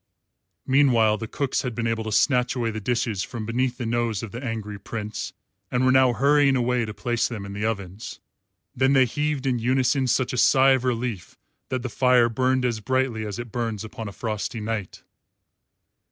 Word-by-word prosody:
Meanwhile 120 -6 +3
the 115 - -5
cooks 135 +4 -1
had 125 -4 -4
been 115 - -2
able 115 -1 -1
to 110 - -3
snatch 125 +2 +2
away 115 -2 -1
the 110 - -4
dishes 115 -3 -1
from 115 -1 -5
beneath 125 +2 -1
the 125 - -4
nose 115 -2 -1
of 110 - -6
the 120 +3 -7
angry 110 -4 -4
Prince 105 -1 -5 0.4
and 125 +1 +1
were 130 - +5
now 130 -1 +5
hurrying 140 +2 +3
away 125 -1 +1
to 105 - -6
place 120 +3 0
them 110 -5 -6
in 100 - -7
the 105 +2 -3
ovens. 100 -2 -4 0.6
Then 130 +2 +3
they 135 -1 +5
heaved 145 +2 -2
in 125 -2 +1
unison 130 +2 +1
such 125 +1 +1
a 125 - 0
sigh 135 0 +5
of 130 -1 +2
relief 120 -6 -3 0.3
that 130 -2 -2
the - - -2
fire 125 0 +3
burned 130 +2 +1
as 120 -3 -1
brightly 120 -1 -1
as 100 - -5
it 120 -2 -7
burns 115 -3 -3
upon 110 0 -7
a - - -6
frosty 110 +2 -4
night. 105 -3 -4
120 Hz, 195 wpm, -24 LUFS, 110-130 Hz, 0.6 s, were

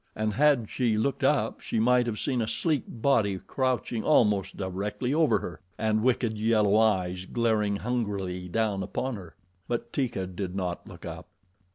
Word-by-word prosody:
And 110 0 -1
had 135 -2 +3
she 115 -3 0
looked 135 +6 0
up - - +2
she - - -2
might 125 +1 +4
have 110 -2 -2
seen 125 0 0
a 110 - -1
sleek 155 -1 0
body 110 -5 +1
crouching 125 0 -1
almost 105 -10 +3
directly 100 +7 -2
over 160 0 +4
her 85 - -7 0.2
and 110 0 +1
wicked 120 -2 +1
yellow 105 -2 +3
eyes 95 -4 +2
glaring 110 -2 +1
hungrily 100 -6 -2
down 105 -1 0
upon 130 +6 -3
her, 90 -5 -10 0.3
but 120 -1 -3
Teeka 120 -8 -1
did 95 0 -5
not 90 -2 -3
look - - -11
up. - - -7
110 Hz, 165 wpm, -28 LUFS, 100-125 Hz, 0.3 s, might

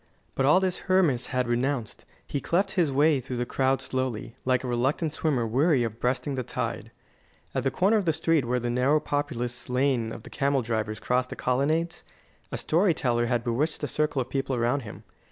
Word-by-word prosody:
But 135 - +1
all 150 +6 +6
this 185 -1 -1
Hermas 165 -10 +3
had 125 -1 -1
renounced. 120 -1 -1 0.2
He 140 - -3
cleft 190 +3 +1
his 170 -6 +1
way 145 +1 +4
through 125 0 -5
the 120 - -1
crowd 130 +1 0
slowly, 130 -3 -3
like 130 0 +2
a - - -3
reluctant 135 +6 0
swimmer 140 -7 0
weary 135 +4 +2
of 115 0 -4
breasting 130 +3 -1
the 130 - -1
tide. 120 - -4 0.6
At - - -1
the 135 - +2
corner 195 +10 +2
of 205 - -1
the 165 - +3
street 160 -1 +2
where 125 +1 0
the 120 0 -2
narrow, 130 +5 +3
populous 125 -6 -3
Lane 125 -3 +1
of 115 - -8
the - - -12
Camel 140 -2 +1
drivers 110 -1 -2
crossed 125 0 0
the - - -6
Colonnades, 155 +7 0 0.5
a - - -2
storyteller 145 -9 +1
had 120 -1 0
bewitched 140 +7 -1
a - - +1
circle 150 +1 0
of 130 - -20
people 135 -1 -1
around 120 +4 +1
him. 115 -6 -10
130 Hz, 200 wpm, -27 LUFS, 120-150 Hz, 0.6 s, all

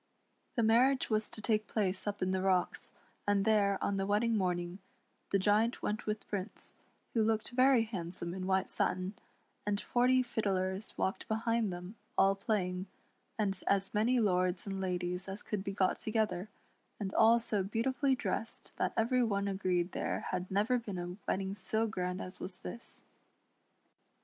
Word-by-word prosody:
The 235 - +2
mar 230 +4 +6
riage 255 - -5
was 215 0 +1
to 215 - -8
take 215 -1 +1
place 195 -2 +1
up 205 -2 -1
in 185 - +1
the 190 0 0
rocks, 185 -1 +1 0.4
and 200 -1 +3
there, 205 -3 +3
on 200 - 0
the 195 0 -1
wedding 220 +3 +2
morning, 180 -2 -1 0.5
the 195 - +3
Giant 210 +4 +2
went 210 +1 -2
with 210 0 -3
Prince, 200 +1 -5 0.4
who 230 - +3
looked 220 0 +1
very 255 -1 +5
handsome 175 -5 -5
in 185 0 -4
white 190 0 +1
satin, 185 +2 0 0.5
and 205 -1 0
forty 255 +3 +3
fiddlers 195 -4 -2
walked 190 - -1
behind 225 -1 0
them, 180 +5 -7 0.2
all 195 0 +5
playing, 195 -2 -1 0.5
and 195 -3 0
as 195 -1 +3
many 235 +4 +3
lords 180 -4 +1
and 195 -1 -3
ladies 180 0 -2
as 195 +2 -5
could 205 -3 -3
be 195 - -3
got 195 -1 +1
together, 215 -4 0 0.5
and 195 -2 -3
all 225 +1 +6
so 215 -3 0
beautifully 250 +7 +1
dressed 225 -2 -4
that - - 0
every 245 +3 +3
one 200 -4 +1
agreed 185 -2 0
there - - -2
had 185 0 -2
never 215 +6 +2
been 205 -5 -6
a 175 0 -4
wedding 190 0 -1
so 220 +3 0
grand 180 -4 -2
as 185 - -7
was 180 0 0
this. 235 - -4
200 Hz, 170 wpm, -33 LUFS, 185-220 Hz, 0.5 s, mar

